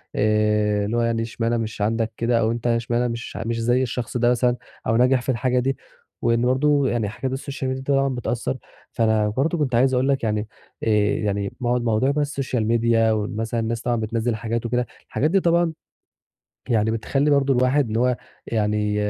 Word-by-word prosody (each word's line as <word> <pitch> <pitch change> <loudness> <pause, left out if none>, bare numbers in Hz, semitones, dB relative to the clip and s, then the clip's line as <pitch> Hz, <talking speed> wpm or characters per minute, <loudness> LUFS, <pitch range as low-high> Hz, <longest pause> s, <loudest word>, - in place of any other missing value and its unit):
آآ، 105 -1 +2
اللي 115 +3 -1
هو - - +2
يعني 115 -1 0
اشمعنى 115 +1 -1
مش 110 -2 -4
عندك 115 +1 0
كده 115 0 +1
أو 110 0 +2
أنت 120 +1 -3
اشمعنى 120 +1 +1
مش 115 0 -5
مش 115 0 -2
زي 120 +3 +2
الشخص 125 0 -3
ده 120 0 +3
مثلًا 125 0 +2 0.3
أو 110 - +2
ناجح 125 +1 +4
في 130 - -7
الحاجة 125 +1 +1
دي، 135 +1 -1 0.4
وإن 115 0 +2
برضه 140 +2 +3
يعني 110 -4 -1
حاجات 130 +5 -4
السوشيال 135 0 -4
ميديا 130 0 -3
طبعًا 135 -1 +1
بتأثّر. 125 +1 -2 0.3
فأنا 110 -2 +2
برضه 140 +10 0
كنت 140 -6 0
عايز 130 +2 +3
أقول 125 +1 +2
لك 135 -3 +1
يعني 105 -1 -1 0.4
آآ، - - -2 0.3
يعني 100 -1 -2
مو 120 -1 +1
موضوع 120 +3 +1
بقى 150 - 0
السوشيال 135 -6 -1
ميديا 115 -1 +3
ومثلًا 110 +2 -2
الناس 115 +1 -2
طبعًا 120 -1 0
بتنزِّل 115 +1 -1
حاجات 115 +2 -3
وكده، 125 +1 0 0.2
الحاجات 155 +4 0
دي 195 - +4
طبعًا 170 -2 +2 1.0
يعني 110 -2 +2
بتخلّي 135 +6 0
برضه 140 -1 +3
الواحد 130 +2 +2
إن 110 - -1
هو 125 +1 +2 0.3
يعني 105 -1 0
120 Hz, 190 wpm, -23 LUFS, 110-130 Hz, 1.0 s, ناجح